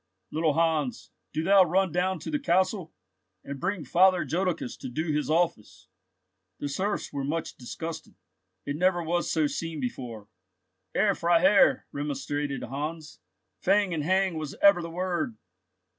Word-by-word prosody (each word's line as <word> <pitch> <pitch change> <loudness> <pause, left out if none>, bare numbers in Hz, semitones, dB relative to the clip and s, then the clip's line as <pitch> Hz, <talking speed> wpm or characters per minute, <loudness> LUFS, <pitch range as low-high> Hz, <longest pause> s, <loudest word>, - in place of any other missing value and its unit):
Little 155 -1 +1
Hans, 160 -5 0 0.2
do 155 - -2
thou 195 +2 +6
run 185 +1 +1
down 180 +3 0
to - - -5
the 295 - 0
castle, 185 - +1 0.5
and 140 -1 -7
bring 185 -2 -2
Father 185 +5 +4
Jodocus 180 -7 -1
to - - -7
do 155 +5 -2
his 150 0 -1
office!" 165 -9 -1 0.7
The 145 - -4
serfs 195 +9 -2
were 140 - -2
much 155 +4 -3
disgusted. 160 +6 -7 0.5
"It 145 +1 -3
never 180 0 +2
was 175 +2 -1
so 160 -2 +2
seen 160 +1 -3
before, 120 -4 -5 0.7
Herr 200 0 +3
Freiherr," 175 +3 +4
remonstrated 145 0 -3
Heinz; 150 +4 -5 0.4
"fang 195 -1 +2
and 155 -3 -1
hang 185 0 +1
was 155 -2 -5
ever 200 -3 +6
the 170 - -5
word." 175 -9 -2
165 Hz, 145 wpm, -27 LUFS, 145-185 Hz, 0.7 s, thou